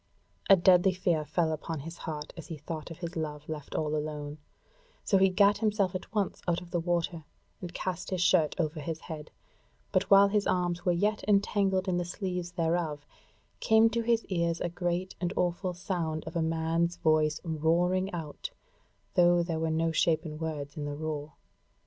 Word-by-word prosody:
A 195 - +10
deadly 185 +1 +5
fear 175 -4 +1
fell 160 +1 0
upon 155 0 -4
his 165 +3 -8
heart 150 -1 -5
as 165 - -9
he 165 - -6
thought 155 +2 -6
of 165 - -8
his 175 0 -6
love 150 -2 -4
left 150 -2 -6
all 155 -1 0
alone; 150 0 -4 0.6
so 195 - +3
he 190 0 +5
gat 200 +2 +4
him 215 -1 +2
at 185 -1 -1
once 205 -4 -1
out 175 -1 +2
of 175 -1 -13
the 175 - +1
water 170 -1 -1 0.4
and 175 -2 -6
cast 180 0 -4
his 185 - -2
shirt 170 -3 +3
over 155 -1 -1
his 160 +2 -4
head; 155 -2 -7 0.6
but - - +1
while 200 0 +7
his 205 0 +1
arms 175 -1 0
were 180 - +4
yet 205 +5 +1
entangled 200 -2 +2
in 180 -1 +1
the 175 - 0
sleeves 180 -1 -4
thereof, 165 -4 -1 0.5
came 220 - +5
to 235 +1 0
his 230 0 +1
ears 170 -2 0
a 175 - -1
great 175 +1 -2
and 175 +1 -1
awful 180 +1 -1
sound 170 -4 -2
of 160 - -7
a 170 - +1
man's 165 +1 0
voice 155 -1 +2
roaring 175 +4 +1
out, 160 - -5 0.6
though 175 -1 +5
there 165 -2 -2
were 160 0 0
no 165 +1 +1
shapen 155 -1 +1
words 150 -3 -4
in 150 - -4
the 145 0 -4
roar. 150 -1 -4
170 Hz, 185 wpm, -29 LUFS, 155-185 Hz, 0.6 s, A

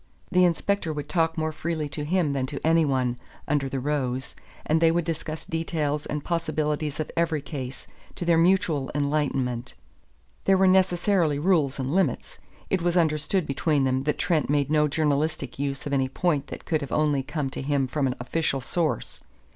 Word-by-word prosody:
The 180 -1 +5
inspector 175 +1 0
would 150 -1 -5
talk 165 -2 +1
more 160 0 0
freely 155 -1 -3
to 145 +1 -5
him 160 -2 +1
than 130 -2 -1
to 140 +1 -5
any 165 0 +4
one, 125 -3 0 0.3
under 140 -2 0
the 135 - -2
rose, 130 -2 -2 0.3
and 160 +1 +2
they 165 - +6
would 170 0 +1
discuss 160 -1 -4
details 155 -3 -2
and 150 -1 -3
possibilities 155 -3 -1
of 155 - -3
every 165 -3 0
case, 135 -4 -6 0.3
to 175 - -4
their 170 -1 +4
mutual 165 -6 +2
enlightenment. 140 -4 -1 0.7
There 195 -1 +5
were 190 - +4
necessarily 185 -3 +3
rules 150 -4 +2
and 135 +1 -2
limits. 180 -9 0 0.3
It 190 - +2
was 175 +1 +1
understood 160 +2 +1
between 145 +1 +1
them 130 0 +1
that 150 -1 0
Trent 160 -5 +1
made 145 0 +1
no 150 -1 +4
journalistic 150 -2 -1
use 140 -1 -2
of 145 - -3
any 135 -1 +1
point 150 -1 0
that - - -8
could 155 -3 0
only 150 -2 +2
have 135 - -6
come 145 -5 -2
to - - -5
him 140 -1 +1
from 135 +1 0
an 125 - -2
official 135 +3 -1
source. 160 +5 -2
150 Hz, 185 wpm, -26 LUFS, 140-165 Hz, 0.7 s, they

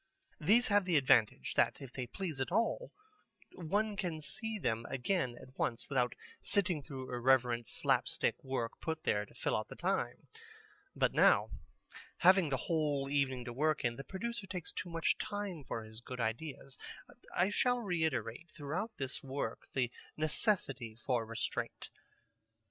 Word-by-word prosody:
These 220 +10 +4
have 205 -2 +4
the 180 -3 +2
advantage 130 -6 +4
that - - +3
if 135 -3 -9
they 125 -2 -4
please 155 - -3
at 130 - -1
all, 230 - +1 0.6
one 205 +5 0
can 180 -6 -2
see 220 +8 -3
them 115 - 0
again 130 -2 0
at 130 - -14
once 115 0 -1
without 125 -3 +1 0.3
sitting 180 -6 +2
through 130 -2 -7
irrelevant 120 -2 +3
slapstick - - +1
work 130 -3 -1
put 160 -1 -3
there 105 0 +1
to - - -19
fill - - 0
out - - -1
the - - -9
time. - - -1 0.7
But - - +2
now, - - +5 0.7
having 185 -2 +6
the 135 - +1
whole 145 -2 0
evening 130 -3 +1
to 120 - -5
work 155 +2 +1
in, 120 0 +1
the 135 - -6
producer 210 +4 -4
takes 180 -3 -4
too 170 +3 -4
much 165 -1 +1
time 205 -7 -3
for 115 - -3
his 110 +1 -10
good 125 +1 -7
ideas. 130 +4 -3 0.6
I 185 +3 +3
shall 245 +3 +3
reiterate 160 - -1
throughout 160 +10 -4
this 135 0 -4
work 135 +1 -4
the 125 -3 +1 0.3
necessity 150 - 0
for 120 -1 -1
restraint. 115 0 -3
145 Hz, 155 wpm, -34 LUFS, 125-185 Hz, 0.7 s, having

